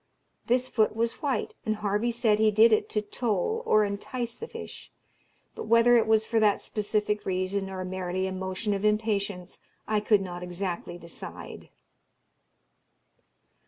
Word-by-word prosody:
This 250 +2 +2
foot 220 -4 +1
was 230 +1 -1
white, 270 -8 -1
and 215 - 0
Harvey 210 +2 0
said 225 -3 +2
he 220 0 +5
did 220 +2 +6
it 215 - +1
to 210 - -1
toll 225 - -1
or 215 0 +5
entice 230 +4 -4
the 460 - -7
fish; - - -9 0.6
but - - -7
whether 230 +2 +6
it 230 - +4
was 220 0 +3
for 225 0 +1
that 210 -2 +3
specific 210 0 -2
reason, 190 +1 -1
or 185 -1 -5
merely 185 0 -2
a 190 - -2
motion 190 +3 -2
of 200 0 -3
impatience, 205 -4 -1 0.3
I 215 -1 +2
could 210 -1 +3
not 175 -2 -6
exactly 180 -1 -4
decide." 170 -1 -8
210 Hz, 155 wpm, -27 LUFS, 190-225 Hz, 0.6 s, did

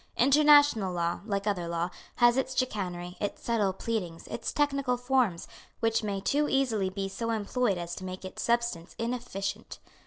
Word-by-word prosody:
International 285 -6 +5
law, 170 -1 -1
like 200 -2 -1
other 190 -5 -1
law, 170 +1 -2 0.2
has 240 0 +5
its 260 0 -1
chicanery, 180 -7 -2
its 205 - -4
subtle 215 -5 +1
pleadings, 185 -4 -4
its 230 - -3
technical 275 -4 +1
forms, 245 -8 +1 0.3
which 225 0 +1
may 200 -2 -2
too 290 +9 +1
easily 230 -8 +1
be 195 +1 -3
so 230 +4 -4
employed 225 -1 0
as 175 0 -5
to 185 - -7
make 185 0 -6
its 185 - -6
substance 235 -8 -1
inefficient. 230 -4 -4
215 Hz, 160 wpm, -29 LUFS, 185-250 Hz, 0.3 s, International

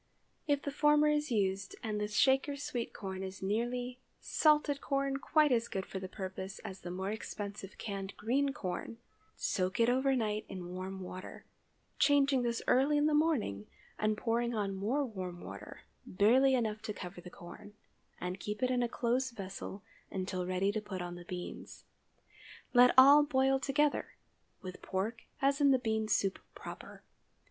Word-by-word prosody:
If 285 -1 +1
the 285 - -3
former 295 +1 +4
is 300 0 +1
used—and 205 0 -1
the 210 - 0
Shaker 270 +6 +3
sweet 250 -4 -4
corn 190 -2 -6
is 190 0 -6
nearly, 245 +5 -1 0.2
salted 300 -2 +2
corn 275 -1 0
quite 305 +1 +3
as 235 -1 +2
good 190 -1 -3
for 190 - -6
the 185 0 -6
purpose 190 0 -6
as 190 0 -6
the 175 - -7
more 190 +2 -3
expensive 205 -2 -6
canned 195 -2 -5
green 270 +6 +1
corn—soak 195 -4 -4
it 230 +1 +5
overnight 245 -5 +1
in 180 -2 -6
warm 190 +1 -5
water—changing 275 +8 -1
this 235 -1 -1
early 275 +4 +4
in 295 - +3
the 305 - +3
morning, 295 - +1 0.3
and 215 0 +1
pouring 235 +1 0
on 200 -2 -1
more 230 +10 0
warm 185 -6 -6
water, - - -9 0.3
barely 255 +8 +4
enough 220 -3 -1
to 220 -1 -4
cover 180 -2 -8
the 180 - -10
corn, 180 +4 -12 0.4
and 180 +1 -4
keeping 210 +6 -2
it - - +1
in 250 - +1
a 240 - 0
close 250 +3 0
vessel 195 -2 -7 0.3
until 185 -1 -3
ready 185 +2 +1
to 215 +1 -2
put 190 -4 -5
on 175 0 -5
the 175 0 -10
beans. 180 0 -7 0.9
Let 245 0 +8
all 280 +3 +9
boil 270 -2 +2
together, 290 +2 0 0.5
with 185 -1 -8
pork 215 +5 -3 0.2
as 275 +1 +3
in 285 - +6
the 265 - +6
bean 220 -3 -1
soup 195 -2 +1 0.2
proper. - - -9
220 Hz, 160 wpm, -33 LUFS, 190-270 Hz, 0.9 s, all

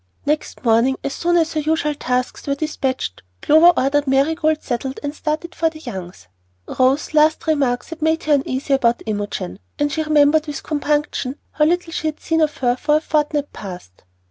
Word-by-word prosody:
Next 300 +1 -2
morning, 235 +4 +3
as 275 - -2
soon 345 +1 +1
as 325 -1 +1
her 310 - 0
usual 305 0 0
tasks 250 0 -2
were 280 - +1
despatched, 270 - -3 0.2
Clover 320 +4 +7
ordered 285 +2 +1
Marigold 310 +3 +1
saddled 260 +2 -3
and 290 0 -3
started 310 +3 -3
for 325 - +1
the 320 - -12
Youngs'. 190 - -8 0.4
Rose's 265 +4 +1
last 310 +1 +3
remarks 275 -6 0
had 325 0 -8
made 320 +1 +1
her 305 - +2
uneasy 270 0 0
about 240 -3 +2
Imogen, 205 - -4 0.2
and 290 0 0
she 315 - -1
remembered 305 0 +3
with 295 -2 -5
compunction 295 -2 -1
how 300 - +2
little 345 +1 0
she 320 - -2
had 305 - -4
seen 325 0 0
of 305 -1 +1
her 245 -2 +1
for 300 +3 +2
a - - +4
fortnight 295 -2 -1
past. 180 - -10
295 Hz, 185 wpm, -20 LUFS, 260-310 Hz, 0.4 s, Clover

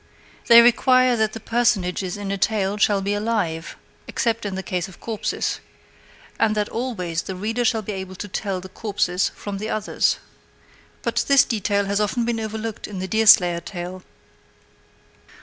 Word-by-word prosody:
They 235 0 +10
require 255 +1 +4
that 220 -1 0
the 225 - -6
personages 205 -6 0
in 200 -1 -4
a 200 - -1
tale 205 0 0
shall 205 -1 +2
be 200 +1 0
alive, 205 -7 -2 0.3
except 230 -2 -1
in 195 - -4
the 190 - -4
case 180 -2 -2
of 190 - -15
corpses, 225 -2 -3 0.8
and 220 -1 +2
that 210 -1 0
always 185 -9 -3
the 190 - -6
reader 225 +6 -2
shall 225 -2 +1
be 210 - -5
able 190 -1 -6
to 205 - -6
tell 195 -1 -3
the 190 - -9
corpses 190 -3 -1
from 200 -1 -6
the 215 +2 -4
others. 215 0 0 0.9
But - - 0
this 275 -2 +6
detail 200 -2 0
has 200 +1 0
often 230 +3 0
been 235 -1 -1
overlooked 220 0 -5
in 205 - -7
the 185 +1 -3
Deerslayer 190 -5 +5
tale. 180 0 -7
205 Hz, 165 wpm, -22 LUFS, 190-225 Hz, 0.9 s, They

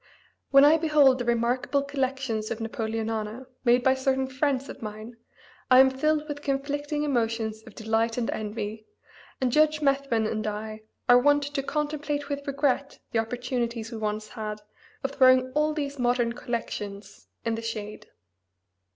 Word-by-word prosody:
When 275 0 +7
I 310 +2 +6
behold 295 -5 +4
the 245 - -2
remarkable 240 +4 +1
collections 265 -5 -2
of 230 - -3
Napoleonana 225 +1 -3 0.2
made 245 0 +4
by 260 - +5
certain 265 0 0
friends 265 0 -1
of - - -9
mine 215 +2 -7 0.5
I 255 0 +8
am 265 0 +7
filled 305 +3 0
with 290 -1 -5
conflicting 290 +2 -2
emotions 225 -5 -1
of 220 - -13
delight 225 +1 0
and 235 -2 0
envy, 215 0 -5 0.5
and 255 -2 +1
Judge 305 +2 +4
Methuen 275 -6 +1
and 215 0 -2
I 215 +1 -5 0.3
are 245 0 +8
wont 290 +2 +4
to 285 0 -2
contemplate 295 0 -2
with 285 0 -4
regret 280 0 0
the 225 - +1
opportunities 235 -1 -3
we 225 - -5
once 215 0 -3
had 215 -2 -5 0.4
of 270 - -1
throwing 255 -1 +5
all 300 +2 +1
these 285 -2 -4
modern 240 -1 +1
collections 210 -4 -6 0.2
in 230 - +1
the 225 - -3
shade. 215 -2 -6
250 Hz, 155 wpm, -27 LUFS, 225-280 Hz, 0.5 s, I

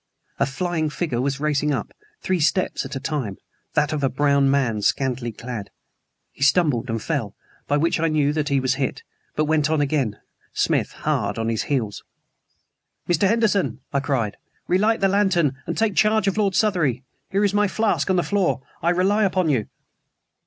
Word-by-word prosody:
A 140 - +2
flying 160 +2 -1
figure 150 -6 -2
was 135 +1 -1
racing 150 0 +1
up, 135 - -3 0.3
three 185 -1 0
steps 175 +4 +1
at - - -6
a - - -2
time 130 -10 -3 0.4
(that 150 +1 +2
of 150 -2 -2
a 135 - +3
brown 140 0 +2
man 125 -6 +1
scantily 125 0 0
clad). 115 -2 -7 0.6
He - - -20
stumbled 140 -4 +3
and 115 0 -1
fell, - - -3 0.3
by 145 - +2
which 165 +2 +1
I 165 - +2
knew 150 -2 +2
that 150 -2 -1
he 140 -1 +2
was 130 0 +1
hit; 135 - -2 0.3
but 155 - +1
went 155 -1 +2
on 160 -1 +1
again, 135 -7 0 0.4
Smith - - +1
hard 100 +1 -1
on 115 0 -1
his 115 -2 0
heels. 115 -8 -1 1.0
"Mr. 175 +3 +3
Henderson!" 215 -3 +1
I 140 - +2
cried, 125 -7 -1 0.3
"relight 210 +5 +2
the 195 - +4
lantern 180 -9 +2
and - - -3
take 220 -2 +2
charge 215 0 +3
of 195 - +1
Lord 200 -3 +1
Southery. 165 - +1 0.3
Here 200 +2 +2
is 200 - +1
my 205 0 +3
flask 220 0 0
on 190 - +3
the 175 - +2
floor. 195 -8 +1 0.2
I 170 - +2
rely 190 +4 +2
upon 185 -4 +1
you." 125 -8 +1
150 Hz, 185 wpm, -23 LUFS, 135-185 Hz, 1.0 s, the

